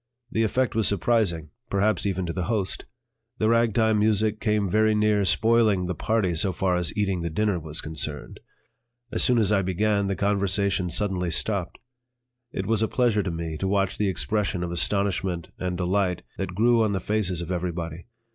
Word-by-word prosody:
The 110 - 0
effect 125 +3 +1
was 110 -2 +1
surprising, 95 -6 +1 0.2
perhaps 100 +1 +1
even 95 -2 -1
to 85 - -3
the 90 -1 -2
host; 105 -3 -2 0.5
the 110 - +1
ragtime 115 -2 +3
music 110 0 +1
came 105 -2 +1
very 110 +3 +2
near 105 -1 +2
spoiling 110 -1 +3
the 90 - -2
party 100 0 0
so 90 +4 +1
far 90 0 0
as 90 -2 0
eating 95 -4 0
the 85 - -2
dinner 100 +2 0
was 80 0 -5
concerned. 80 -2 -4 0.7
As - - +1
soon 125 - +4
as 105 -3 +2
I 100 -2 +3
began, 100 +2 0
the 100 - -1
conversation 100 -2 +1
suddenly 90 -2 -1
stopped. 95 +1 -1 0.7
It 95 - -4
was 110 +1 +1
a 110 - +2
pleasure 120 -4 +1
to 95 - -3
me 85 -2 -4
to 95 - -2
watch 95 -1 0
the 105 -2 +2
expression 95 -2 -1
of 85 - -4
astonishment 90 -2 0
and 90 -1 -2
delight 90 0 0 0.2
that 95 -2 -4
grew 115 +3 +3
on 110 -2 +1
the 95 - 0
faces 100 -5 0
of 85 +1 -4
everybody. 85 -1 -4
100 Hz, 185 wpm, -25 LUFS, 90-110 Hz, 0.7 s, soon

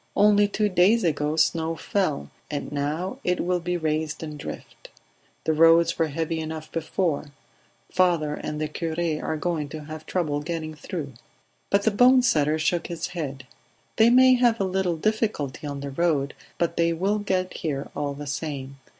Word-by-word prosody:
"Only 205 0 +5
two 210 +1 0
days 195 +4 +4
ago 150 -2 0
snow 160 +1 +1
fell, 175 -4 -1 0.2
and 145 -2 -4
now 150 +6 -2
it 180 0 +1
will 180 0 0
be 175 +1 -2
raised 155 -1 -2
and 155 -1 -6
drift. 145 - -9 0.5
The 160 - +1
roads 165 +2 +5
were 165 - +3
heavy 160 +2 -2
enough 160 0 -6
before; 160 -1 -1 0.6
father 170 -5 +2
and 150 0 -5
the 155 - -1
cure 160 +1 -4 0.3
are 155 - -2
going 155 -3 -2
to 155 0 -7
have 155 +1 -9
trouble 155 -5 0
getting 160 0 -4
through." 150 -2 -6 0.6
But 200 0 +2
the 220 - +3
bone 250 +4 +6
setter 155 -9 +2
shook 165 +2 0
his 170 0 -4
head. 140 -7 -5 0.5
"They 225 +1 +6
may 255 +1 +7
have 240 -2 +3
a - - +2
little 185 -2 0
difficulty 210 - -1
on 140 -1 -5
the 140 0 -5
road, 145 -2 +1 0.2
but 170 -1 -1
they 170 0 +3
will 195 +5 0
get 185 -3 -1
here 145 -3 -3
all 145 -1 -2
the 145 +1 -7
same. 140 -2 -5
165 Hz, 175 wpm, -25 LUFS, 150-185 Hz, 0.6 s, may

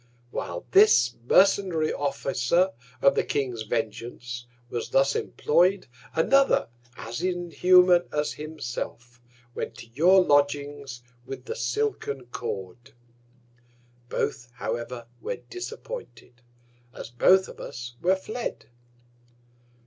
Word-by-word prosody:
Whilst 85 +7 -5
this 125 - +6
mercenary 185 -3 +4
Officer 140 +5 +1 0.3
of 140 - +6
the - - +1
King's 125 -5 -2
Vengeance 120 +2 -4 0.2
was 120 -1 -4
thus 135 +1 +3
employ'd, 180 +5 +2 0.3
another 275 - +3 0.3
as 115 +2 -6
inhuman 180 0 +4
as 150 0 -1
himself, 120 -5 -6 0.3
went 115 - -5
to 115 - -11
your 180 +7 +5
Lodgings 145 -3 0 0.2
with 135 +2 -8
the 460 - -4
silken 425 - -2
Cord. 110 0 -6 1.1
Both, 120 0 -2
however, 120 -1 -4 0.2
were - - -3
disappointed, 390 - -9 0.5
as 120 - -9
both 185 +10 +4
of - - -12
us 120 0 -7
were 185 +2 +3
fled. 220 +5 -5
145 Hz, 105 wpm, -26 LUFS, 120-185 Hz, 1.1 s, this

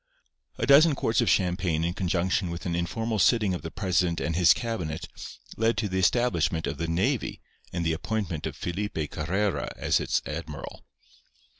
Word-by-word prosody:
A - - 0
dozen 145 +2 +6
quarts 115 -4 +1
of - - +2
champagne 90 -3 +1
in 85 +1 0
conjunction 90 0 0
with 85 0 -6
an 85 - -1
informal 110 +6 -2
sitting 105 -2 +3
of 90 - -4
the 80 - -5
president 90 -2 0
and 85 0 -2
his 90 -1 +6
cabinet 85 -9 -2 0.5
led 115 +1 +2
to 110 - 0
the 95 -1 -1
establishment 95 -4 +2
of - - -4
the 85 - -1
navy 100 +10 0 0.3
and 85 -1 -2
the 80 - +2
appointment 90 -2 -3
of - - -6
Felipe 85 -4 -3
Carrera 95 +6 -1
as - - +2
its - - 0
admiral. 75 -3 -6
90 Hz, 170 wpm, -27 LUFS, 85-105 Hz, 0.5 s, dozen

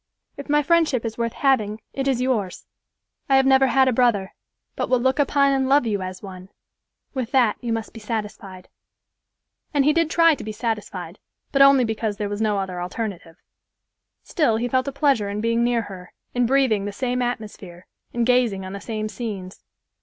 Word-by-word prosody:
If 280 - -9
my 295 0 +3
friendship 305 -6 +2
is 225 +1 -5
worth 230 -1 -1
having, 220 -6 +1
it 270 0 -2
is 255 -2 +1
yours. 215 -8 -2 0.6
I 270 - +5
have 270 0 +4
never 265 0 +5
had 265 +1 +3
a 255 - +2
brother, 225 -6 +1 0.4
but - - -2
will 255 - +3
look 260 +3 +1
upon 280 -1 +3
and 265 -1 0
love 280 -2 +4
you 205 -3 -1
as 185 +1 -7
one; 185 -1 -10 0.6
with 255 -4 -3
that, 245 -5 +3
you 235 - -3
must 225 -1 -3
be 225 - -9
satisfied." 210 -4 -6 1.1
And 280 -2 +3
he 300 - +4
did 330 -1 +1
try 330 0 +5
to 285 - -6
be 215 - -5
satisfied, 220 -1 -4 0.3
but 275 - +2
only 275 -2 +7
because 220 -2 -2
there 205 -1 -3
was 205 +1 -4
no 210 -2 +1
other 185 -2 -3
alternative. 180 -3 -5 0.9
Still 300 - +1
he 240 +2 -1
felt 260 +2 0
a - - -1
pleasure 275 -7 +1
in 205 +1 -3
being 230 +2 +1
near 240 -1 +1
her, 185 -3 -11 0.2
in 245 -1 +1
breathing 255 -6 +2
the 205 - -3
same 250 +3 -2
atmosphere 210 -7 -5 0.3
and 240 -1 0
gazing 240 -6 +2
on 190 - -7
the 200 - -7
same 215 -2 -4
scenes. 205 -5 -7
230 Hz, 195 wpm, -23 LUFS, 205-265 Hz, 1.1 s, only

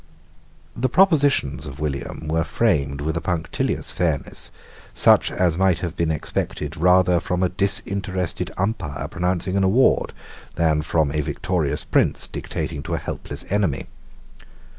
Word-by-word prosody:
The 130 +2 0
propositions 145 - +3
of 70 0 -9
William 75 +1 -4
were 80 +1 +1
framed 70 -2 0
with 80 +2 -2
a 85 - -1
punctilious 85 -3 -2
fairness, 80 -6 -2 0.5
such - - +5
as 90 -2 0
might 95 -3 +3
have 85 0 -5
been 85 -1 0
expected 75 0 -3
rather 90 +1 +4
from 90 +1 -1
a 90 - +2
disinterested 95 -1 -1
umpire 95 -7 -2
pronouncing 90 +1 -1
an 100 - +2
award 110 +8 +3 0.4
than 80 -2 +2
from 75 -1 +1
a 75 +1 0
victorious 75 -1 -2
prince - - +2
dictating 75 -3 -4
to - - -3
a - - -1
helpless - - -5
enemy. 95 -9 0
85 Hz, 140 wpm, -22 LUFS, 75-95 Hz, 0.5 s, such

